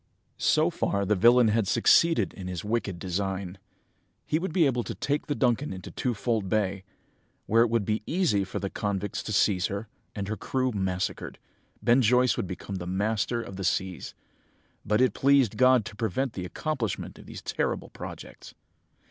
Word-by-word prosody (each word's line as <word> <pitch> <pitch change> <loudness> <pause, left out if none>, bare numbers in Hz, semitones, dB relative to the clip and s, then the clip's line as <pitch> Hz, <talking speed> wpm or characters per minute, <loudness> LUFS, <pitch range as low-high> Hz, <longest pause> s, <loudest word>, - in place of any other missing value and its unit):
"So - - +3
far 100 0 -1
the 105 - +2
villain 120 +4 +5
had 110 -2 +1
succeeded 165 - +4
in 95 -2 -8
his 90 +1 -5
wicked 105 -4 -1
design. 95 +1 -3 0.7
He 155 - 0
would 185 0 -3
be 170 -1 +3
able 125 -3 +1
to - - -5
take 145 +1 -2
the 145 - -1
Duncan 130 +3 +1
into 95 -1 -8
Twofold 115 -4 -1
Bay, 100 -2 0 0.6
where 115 +2 +4
it 120 - +4
would 115 -3 +1
be 110 +1 0
easy 155 - +1
for 95 - -5
the 100 - -3
convicts 100 -1 -2
to - - -6
seize 95 -3 +2
her, 100 +3 -5 0.3
and 100 -2 -4
her 110 - -2
crew 130 +4 -1
massacred, 95 -3 -3 0.5
Ben 120 +2 +5
Joyce 125 +1 +4
would - - -3
become 95 +2 -6 0.2
master 110 +3 0
of 95 - -9
the 95 - -4
seas.... 95 0 -2 0.7
But 105 +3 +1
it 130 -5 +3
pleased 135 -5 +3
God 130 -3 +4
to 115 -2 -8
prevent 115 +4 -1
the 90 - -5
accomplishment 120 - -3
of - - -14
these - - -9
terrible - - -2
projects. - - -10
110 Hz, 175 wpm, -27 LUFS, 95-125 Hz, 0.7 s, villain